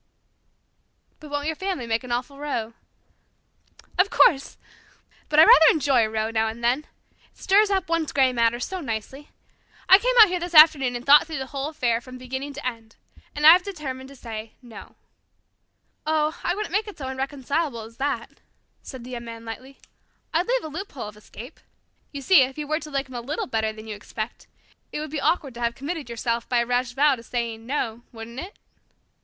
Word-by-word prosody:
'" - - -46
"But 305 - -12
won't 290 0 -3
your 320 +1 -1
family 375 -8 -3
make 230 +1 -1
an 250 - -8
awful 250 +4 -3
row?" 245 -6 -3 1.3
"Of 380 +2 +4
course. 275 -9 +3 0.7
But 300 - 0
I - - +11
rather 320 -1 +8
enjoy 275 -6 +3
a 220 - -1
row 220 0 -2
now 225 0 +1
and 225 +2 -7
then. 255 +6 +1 0.4
It - - -32
stirs 405 +2 +3
up 385 -3 0
one's 330 -2 -1
grey 265 -2 +3
matter 235 0 +1
so 375 +9 -4
nicely. 265 +3 -6 0.6
I 380 - +8
came - - 0
out 435 - +10
here 360 0 -1
this 350 0 -5
afternoon 300 -5 +7
and 240 +1 -6
thought 290 +3 +7
the 290 -5 -4
whole 275 +2 -4
affair 250 -7 0
over - - -8
from 255 +1 -11
beginning 265 +3 -6
to 290 0 -9
end. 230 -3 -6 0.4
And 295 +1 -1
I 315 - +12
have 360 +2 +6
determined 275 -9 -7
to 275 - -13
say 225 -3 -8
'no.'" 235 -2 -12 1.1
"Oh, 310 +1 0
I 350 - 0
wouldn't 415 -4 -5
make 420 +2 0
it 410 - -9
so 270 -4 -6
irreconcilable 270 0 -3
as 225 +1 -12
that," 280 +1 -3 0.4
said 260 -3 -9
the 250 - -10
Young 235 -1 -6
Man 230 0 -9
lightly. 255 +4 -9 0.6
"I'd 335 +3 +1
leave - - 0
a - - -5
loophole 305 - -7
of 210 - -15
escape. 235 +6 -12 0.5
You 280 -2 -7
see, 355 0 +6
if 260 +2 -1
you 300 - -4
were 310 +2 -1
to 305 - -10
like 275 -1 -2
him 260 - -13
a 240 - -4
little 285 +6 -3
better 220 -3 -1
than 215 0 -11
you 215 -1 -6
expect, 215 +2 -7 0.4
it - - -4
would 305 -1 -6
be 300 -2 -3
awkward 300 -4 0
to 240 - -9
have 235 0 -1
committed 295 -1 -5
yourself 235 0 -3
by 245 - +1
a 235 - +2
rash 245 0 -1
vow 285 +1 +3
to - - -11
saying 230 -1 -4
'no,' 240 -4 -2
wouldn't 230 +1 -9
it?" 370 +7 -9
270 Hz, 210 wpm, -24 LUFS, 235-310 Hz, 1.3 s, I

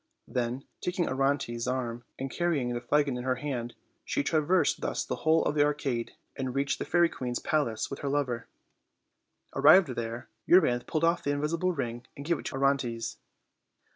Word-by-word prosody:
Then, 125 +2 -2 0.2
taking 180 -1 -1
Orontes' 130 -3 0
arm 120 -2 -2
and 135 0 -4
carrying 150 -9 0
the 120 - -3
flagon 140 +1 +1
in 125 - -4
her 130 0 +1
hand, 125 -3 -4 0.3
she - - -1
traversed 160 +1 +2
thus - - -2
the - - -3
whole 160 +1 +3
of - - +1
the 145 -1 +4
arcade, 140 -5 -1 0.2
and 130 -2 -3
reached 140 0 0
the - - -2
fairy 175 0 +4
queen's 125 -6 -4
palace 140 -8 -1
with 140 - -5
her 140 - -2
lover. 135 -4 -1 1.1
Arrived 155 +5 +7
there, 120 -1 -4 0.2
Euryanthe 125 -9 +4
pulled 155 0 -1
off 170 +1 +3
the - - -1
invisible 155 +5 0
ring 120 -5 -4
and 140 - -7
gave 170 -1 +1
it - - -10
to - - -4
Orontes. 135 -4 0
135 Hz, 175 wpm, -29 LUFS, 120-150 Hz, 1.1 s, Arrived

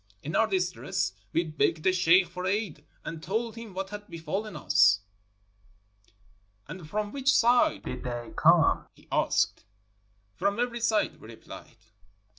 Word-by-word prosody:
In 155 +2 -4
our 225 - +4
distress, 180 - -1 0.2
we 170 - +1
begged 155 0 0
the 185 - +3
sheikh 180 0 +5
for 180 +2 -5
aid 195 -7 -2 0.2
and 165 -1 -6
told 220 +7 -2
him 230 -5 -10
what 195 +1 -4
had 210 0 -8
befallen 170 +5 -5
us. 100 - +4 0.7
" 105 0 -36
'And 165 -2 -9
from 210 +2 -2
which 270 -1 +1
side 240 -1 +3
did - - -6
they 120 -2 -5
come? - - +4
' - - -45
he - - -22
asked. - - +1 0.7
"'From 200 - -1
every 240 -1 -1
side,' 225 -2 0
we - - -12
replied. 115 0 -12
180 Hz, 155 wpm, -28 LUFS, -, 0.7 s, sheikh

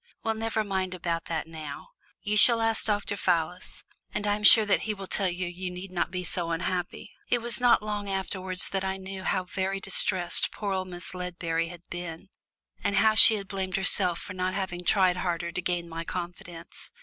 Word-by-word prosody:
"Well, 225 - 0
never 220 0 -2
mind 190 -2 -2
about 170 -2 -3
that 165 -2 -3
now. 155 - -9 0.3
You 210 0 -1
shall 230 +2 +7
ask 225 0 +1
Dr. 205 -1 -1
Fallis, 180 -1 -2 0.3
and 210 - -3
I 205 0 +2
am 210 - -7
sure 220 0 +9
he 210 +1 0
will 195 -1 -8
tell 190 0 +1
you 180 +1 -3
you 180 +1 -5
need 180 +1 -8
not 175 -2 -1
be 180 0 -4
so 175 0 -2
unhappy." 180 +4 -3 0.2
It 245 - +2
was 235 0 -1
not 245 -1 +5
till 215 - -9
long 205 -1 -3
afterwards 190 -1 -1
that 195 -1 -2
I 190 0 -2
knew 190 0 -7
how 185 0 -1
very 190 +1 -3
distressed 185 -2 +2
poor 200 -2 -3
old 185 -1 -2
Miss 175 0 -9
Ledbury 170 -2 -3
had 175 0 -12
been, 175 +1 -7 0.5
and 200 - 0
how 215 +2 +4
she 220 0 +9
had 200 -2 -6
blamed 190 -2 -3
herself 190 -2 +3
for 185 - -8
not 185 0 -2
having 180 -2 -4
tried 185 -1 +3
harder 170 -1 -2
to 185 - -4
gain 175 -1 -2
my 165 0 -6
confidence. 175 -1 -8
185 Hz, 205 wpm, -27 LUFS, 175-200 Hz, 0.5 s, sure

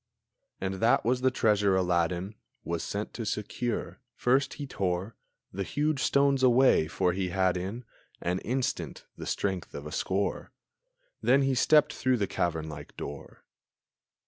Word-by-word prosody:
And 95 0 -2
that 115 -1 +3
was 125 +2 +1
the 130 - +4
treasure 105 -6 +2
Aladdin 90 +1 0 0.3
Was 85 -1 -2
sent 105 +1 -4
to 115 - -4
secure. 110 +2 -3 0.2
First 135 +3 +2
he 145 - -5
tore 95 -3 -2 0.4
The 100 - -3
huge 145 +8 0
stones 140 -1 +3
away, 130 -9 +5
for 90 +2 +1
he 95 0 -1
had 95 0 +2
in 100 +7 -4 0.3
An 90 +2 -1
instant 130 +2 -3
the - - -7
strength 95 -3 -2
of 70 - -6
a 75 - -6
score; 95 +5 -2 0.7
Then 135 +2 +4
he 135 0 +2
stepped 150 +4 +4
through 130 -1 +1
the 105 - +1
cavern 80 -4 -1
like 75 -2 -9
door. 70 0 -8
100 Hz, 150 wpm, -29 LUFS, 90-130 Hz, 0.7 s, away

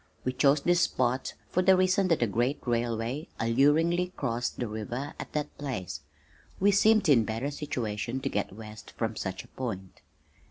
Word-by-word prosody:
We 130 - -1
chose 140 +2 +4
this 175 +3 +3
spot 130 -2 0 0.2
for 180 - +2
the 190 0 +5
reason 185 +1 +3
that 165 -8 +2
a - - +4
great 120 +6 0
railway 120 +4 -1
alluringly 160 +10 +3
crossed 120 -3 -2
the 120 - -2
river 120 +6 -4
at - - -7
that 150 -1 -3
place. 95 - -4 0.6
We 200 +2 +5
seemed 215 +1 +4
in 130 -7 +6
better 115 +6 -2
situation 120 -4 -3
to - - -2
get 100 - -2
west 110 +1 -10
from - - -1
such - - -4
a - - -17
point. 95 -8 -6
130 Hz, 170 wpm, -29 LUFS, 115-155 Hz, 0.6 s, in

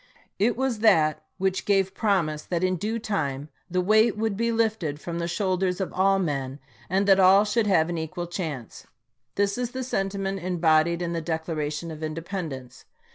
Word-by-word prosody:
It 225 +4 +2
was 260 -4 -1
that 160 -8 +4 0.2
which 190 0 0
gave 195 -2 +2
promise 170 -9 0
that 170 +2 -3
in 185 0 +2
due 215 +6 -2
time 150 -10 -3 0.2
the 180 +1 +1
weight 215 +3 +3
would 220 -1 -1
be 230 +3 0
lifted 220 -10 0
from 170 +2 -5
the 170 - -2
shoulders 185 0 0
of 190 - -3
all 195 +1 +3
men 140 -7 -2 0.3
and 195 +3 +1
that 195 -1 +6
all 190 +2 +6
should 210 +1 +1
have 165 -5 +3
an 170 -1 -3
equal 175 +2 -4
chance. 160 - -6 0.5
This 200 +3 0
is 245 -1 -3
the 260 0 -3
sentiment 195 -4 -2
embodied 170 -1 +2
in 170 0 -2
the 165 - -2
Declaration 160 -1 -3
of 155 0 -9
Independence. 155 -4 -6
185 Hz, 180 wpm, -25 LUFS, 160-200 Hz, 0.5 s, that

